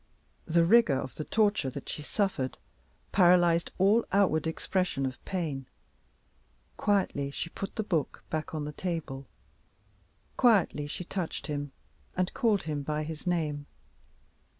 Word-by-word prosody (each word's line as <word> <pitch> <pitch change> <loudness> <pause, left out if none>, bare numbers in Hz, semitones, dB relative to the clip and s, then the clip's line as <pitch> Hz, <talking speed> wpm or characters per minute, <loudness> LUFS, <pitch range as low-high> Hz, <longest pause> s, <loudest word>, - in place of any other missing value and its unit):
The 170 +1 +4
rigor 170 - +5
of 130 -2 -5
the 155 - -5
torture 205 -7 +2
that 135 +1 -8
she - - -4
suffered 150 -5 -1 0.5
paralyzed 175 -2 +5
all 205 +5 +4
outward 180 -6 +3
expression 165 -3 -1
of 130 -1 -5
pain. 150 -8 -3 1.1
Quietly 190 -9 +1
she 165 +4 -5
put 195 - -6
the 220 - -1
book 170 -7 -1
back 155 0 -3
on 150 -1 -2
the 150 - -5
table. 150 -7 -4 1.1
Quietly 200 - +4
she 165 - -5
touched 180 -1 -4
him, 145 -2 -3 0.5
and 185 0 0
called 220 -6 +2
him 150 -2 -2
by 150 +2 -2
his 155 +2 -7
name. 150 -5 -1
165 Hz, 135 wpm, -29 LUFS, 145-190 Hz, 1.1 s, rigor